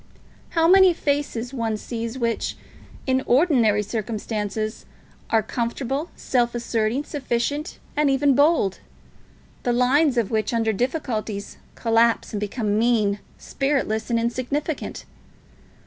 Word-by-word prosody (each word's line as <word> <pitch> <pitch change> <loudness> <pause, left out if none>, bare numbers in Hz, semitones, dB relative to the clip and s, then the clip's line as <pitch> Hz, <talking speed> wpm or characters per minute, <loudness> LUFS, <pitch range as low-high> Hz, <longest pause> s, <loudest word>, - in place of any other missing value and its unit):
How 325 0 +5
many 375 0 +7
faces 280 -5 -1
one 225 -4 -1
sees 230 +2 -5
which, 235 -2 -1 0.5
in 260 -1 +2
ordinary 245 - +4
circumstances, 215 0 -3 0.4
are 225 -1 +3
comfortable, 255 - -2
self 240 -2 0
asserting, 235 +2 0
sufficient, 285 +2 -2 0.2
and 295 -1 +3
even 275 +1 +3
bold; 285 - +3 0.8
the 245 - 0
lines 255 +3 +3
of 230 -4 +1
which, 220 +1 0
under 225 -1 +1
difficulties, 220 -4 -3 0.2
collapse 230 0 +2
and 210 - -1
become 210 0 -1
mean, 215 -4 +2 0.2
spiritless, 265 -6 -1
and 235 - +2
insignificant. 255 +6 -3
235 Hz, 115 wpm, -23 LUFS, 220-275 Hz, 0.8 s, many